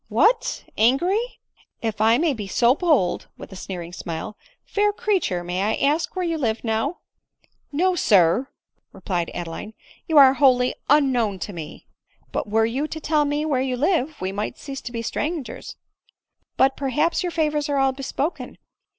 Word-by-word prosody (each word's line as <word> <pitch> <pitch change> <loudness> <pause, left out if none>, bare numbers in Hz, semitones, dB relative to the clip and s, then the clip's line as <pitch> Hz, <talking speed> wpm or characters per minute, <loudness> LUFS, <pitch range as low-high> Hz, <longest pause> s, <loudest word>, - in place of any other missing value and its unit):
" - - -42
What! 475 +6 +2 0.2
angry! 335 - +3 0.6
If 220 -2 -2
I 225 +2 +5
may 315 0 +2
be 210 -5 -6
so 235 +5 +3
bold, 300 - +1
(with - - -11
a - - -9
sneering 175 -2 -7
smile,) 170 +3 -6 0.3
fair 415 0 +1
creature, 400 - -1
may 180 +1 -2
I 210 +2 +1
ask 305 +6 0
where 370 -1 -1
you 330 -2 -1
live 225 -4 -1
now 225 +8 -1 0.2
?" - - -39
" - - -45 0.2
No, 365 +6 +2
sir," 205 - +3 0.4
replied 175 -4 -3
Adeline; 175 +5 -6 0.2
" - - -27
you 320 - +2
are 270 -2 +9
wholly 255 -2 +3 0.2
unknown 255 -8 +3
to 200 - -5
me." 160 -3 -8 0.2
" - - -38
But - - -3
were 220 +1 +3
you 260 +7 -1
td 315 - -6
tell 300 -1 +2
me 290 +1 -1
where 275 -5 +1
you 260 -1 -1
live, 305 0 0
we 185 +1 -2
might 205 +2 -4
cease 275 -2 -7
to 245 - -7
be 230 -1 -4
strangers; 300 +4 -4 0.8
but, 270 0 +4
perhaps 295 +5 0
your 355 -2 -2
favors 300 -2 0
are 285 - +1
all 270 0 +3
bespoken. 275 +4 -4
265 Hz, 185 wpm, -23 LUFS, 215-310 Hz, 0.8 s, are